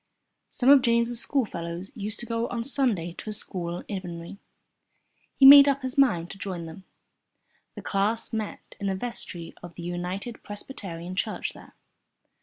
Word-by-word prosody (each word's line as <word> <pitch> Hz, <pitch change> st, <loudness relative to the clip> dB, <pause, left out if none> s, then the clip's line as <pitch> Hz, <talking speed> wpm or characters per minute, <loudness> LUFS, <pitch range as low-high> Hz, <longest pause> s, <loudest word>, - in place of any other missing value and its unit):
Some 255 Hz, -, +1 dB
of 285 Hz, -2 st, +8 dB
James' 235 Hz, 0 st, +2 dB
schoolfellows 185 Hz, -10 st, -1 dB
used 215 Hz, -2 st, -5 dB
to -, -, -6 dB
go 230 Hz, 0 st, -2 dB
on 235 Hz, -1 st, -3 dB
Sundays 230 Hz, -, 0 dB
to -, -, -7 dB
a -, -, -3 dB
school 175 Hz, -4 st, -4 dB
in 195 Hz, -2 st, -4 dB
Inverary. 175 Hz, +2 st, -8 dB, 1.0 s
He 270 Hz, -, +5 dB
made 280 Hz, +1 st, +11 dB
up 275 Hz, -1 st, +1 dB
his 260 Hz, 0 st, -3 dB
mind 180 Hz, -, +2 dB
to 195 Hz, -, -10 dB
join 185 Hz, -4 st, -5 dB
them. 170 Hz, +4 st, -11 dB, 0.9 s
The -, -, -8 dB
class 205 Hz, +4 st, 0 dB
met 220 Hz, -2 st, -5 dB
in 200 Hz, -, -2 dB
the 195 Hz, -, 0 dB
vestry 190 Hz, -6 st, -6 dB
of 175 Hz, -1 st, -11 dB
the 170 Hz, -, -8 dB
United 180 Hz, +6 st, -5 dB
Presbyterian 185 Hz, -5 st, -7 dB
Church 215 Hz, +2 st, -2 dB
there. -, -, -15 dB
200 Hz, 165 wpm, -26 LUFS, 175-240 Hz, 1.0 s, made